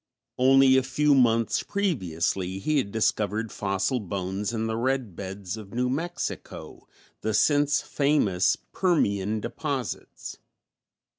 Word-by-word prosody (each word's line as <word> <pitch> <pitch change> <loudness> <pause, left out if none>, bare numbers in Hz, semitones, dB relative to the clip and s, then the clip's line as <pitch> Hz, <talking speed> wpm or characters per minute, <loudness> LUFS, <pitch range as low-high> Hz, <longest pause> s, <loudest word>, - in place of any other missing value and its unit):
Only 135 +1 +6
a - - +4
few 145 +3 +2
months 115 -4 +3
previously 95 - -1
he 150 +9 +1
had 100 -6 -3
discovered 110 0 0
fossil 100 +6 -1
bones 95 +1 -3
in 115 -1 -2
the 110 0 -2
red 125 -4 -1
beds 95 +1 -6
of 105 0 -10
New 125 +1 0
Mexico, 170 +5 -5 0.3
the 110 -1 -1
since 145 +4 +3
famous 125 -11 +2 0.2
Permian 105 - +1
deposits. - - -5
115 Hz, 120 wpm, -26 LUFS, 100-135 Hz, 0.3 s, Only